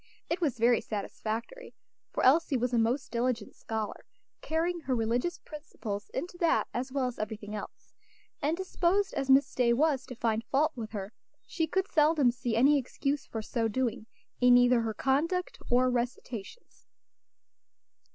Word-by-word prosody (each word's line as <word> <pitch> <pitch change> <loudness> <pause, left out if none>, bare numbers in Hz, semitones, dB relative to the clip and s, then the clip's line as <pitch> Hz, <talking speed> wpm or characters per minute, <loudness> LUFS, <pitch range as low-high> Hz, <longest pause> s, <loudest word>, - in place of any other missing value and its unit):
It 340 +2 -1
was 285 -7 0
very 235 0 +4
satisfactory, 225 - -5 0.3
for - - -3
Elsie 285 +1 +4
was 245 +1 -1
a 235 - +3
most 235 +4 0
diligent 235 -2 -1
scholar, 220 -2 -5 0.4
carrying 335 +2 -1
her 265 -5 -1
religious 240 +9 0
principles 225 -9 -7
into 350 +5 -5
that 335 -2 +2
as 255 +2 -3
well 270 -1 0
as 250 -1 -4
everything 215 -1 -5
else; 210 - -8 0.5
and 310 +3 0
disposed 380 +1 +1
as 270 - -2
Miss 270 +2 +5
Day 240 -2 +3
was 285 +1 +1
to 250 - -7
find 225 -1 0
fault 295 +5 +2
with 225 -3 -5
her, 200 0 -5 0.3
she 325 -2 -1
could 380 +4 0
seldom 300 -5 +4
see 240 -1 -3
any 280 +5 +5
excuse 275 +2 -3
for 220 -1 -5
so 230 +1 -1
doing, 230 -1 -2 0.3
in 245 0 +7
either 245 -1 +5
her 220 -1 -3
conduct 320 - 0
or 250 +1 +4
recitations. 245 - -4
250 Hz, 160 wpm, -30 LUFS, 230-305 Hz, 0.5 s, in